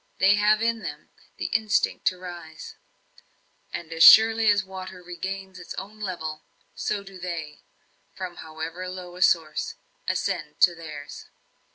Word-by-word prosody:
They 195 +1 +5
have 210 +1 +3
in 230 0 +1
them 150 -7 -7 0.3
the - - -4
instinct 220 -2 +1
to 185 - +2
rise; 175 -3 -9 1.0
and 165 -1 -6
as 165 - -4
surely 225 +3 +9
as 205 -1 +4
water 185 -1 -9
regains 190 +2 -6
its 180 - -8
own 210 +3 -8
level, 165 -6 -4 0.3
so 205 -1 -2
do 195 -1 -12
they, 165 -4 -5 0.6
from 185 -2 -6
however 160 +3 -6
low 180 -1 -8
a 180 - -9
source, 160 -4 +2 0.3
ascend 165 -6 -2
to 175 - +7
theirs. 155 -4 -9
180 Hz, 145 wpm, -26 LUFS, 165-195 Hz, 1.0 s, surely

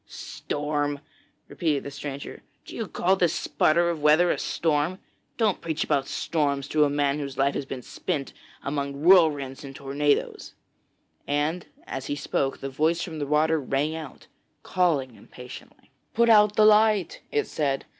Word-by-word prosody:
'Storm!' 145 -1 -3 0.5
repeated 155 -5 -1
the 140 - -7
stranger. 140 0 -7 0.2
'Do - - -10
you 225 - -4
call 185 +2 +1
this 175 -3 +1
sputter 170 +2 +2
of 160 -3 -5
weather 155 +4 +5
a - - -1
storm? 160 +2 0 0.4
Don't 215 -5 +1
preach 160 -2 -2
about 140 -3 0
storms 140 -4 -1
to 155 -1 +3
a - - +1
man 145 0 0
whose 140 -3 -6
life 140 +1 +2
has 140 - -4
been 130 -2 -6
spent 140 -2 -4 0.3
amongst 140 0 -3
whirlwinds 150 -5 +4
and 135 -1 -9
tornadoes,' 145 +1 -1 0.7
and 150 +4 -1 0.2
as 135 0 -6
he 145 - -2
spoke, 135 -1 -2
the 135 - -3
voice 160 +5 +1
from 160 -3 -6
the 145 - -3
water 155 +2 +2
rang 140 +4 -1
out, 155 -4 -9 0.4
calling 155 -9 0
impatiently. 125 +2 -13 0.2
'Put 235 0 +4
out 210 -1 +5
the 215 - +5
light,' 215 -3 +4
it 145 - +1
said. 140 -3 -2
150 Hz, 160 wpm, -25 LUFS, 140-170 Hz, 0.7 s, weather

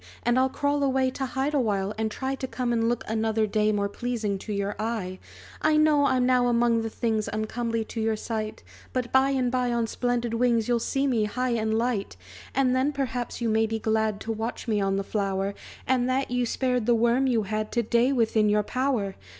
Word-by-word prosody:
and 240 +1 +3
I'll 260 0 +3
crawl 285 +2 0
away 265 -1 +2
To 265 0 -3
hide 265 +3 -1
awhile, 205 -7 0
and 220 0 -1
try 265 +4 -3
To 265 -1 -4
come 250 -2 -2
and 230 0 +1
look, 240 - -1
another 220 0 +1
day, 215 0 +1
More 200 -1 0
pleasing 215 -2 -3
to 215 - -7
your 200 0 -2
eye. 215 -5 -3 0.4
"I 310 0 +3
know 300 -2 +4
I'm 255 -2 +2
now 250 -1 +3
among 235 -1 +3
the 225 - -3
things 220 -1 -1
Uncomely 225 +1 -2
to 225 - -5
your 220 0 +1
sight; 215 0 -4 0.3
But 250 -2 -2
by 265 +1 +4
and 260 -3 +1
by 250 -1 0
on 235 -1 +1
splendid 240 0 -1
wings 230 -2 +2
You'll 240 -1 +2
see 270 +4 0
me 235 -6 +2
high 250 +4 -1
and 220 -1 0
light! 225 - -1 0.4
"And 260 -1 +3
then, 265 +3 +2
perhaps, 250 -4 -3
you 235 - +1
may 220 0 +2
be 225 0 -2
glad 220 -1 0
To 225 - -3
watch 225 +3 -4
me 210 -2 +1
on 195 0 +1
the 195 - -1
flower; 195 -1 -1 0.3
And 255 -1 +1
that 260 0 0
you 245 -1 +1
spared 250 -2 0
the 240 - +5
worm 235 +4 +2
you 235 -4 +2
had 215 +2 -3
To 235 - +1
day 235 +4 +2
within 225 -4 +2
your 210 0 +3
power!" 250 -5 -1
235 Hz, 215 wpm, -26 LUFS, 215-255 Hz, 0.4 s, the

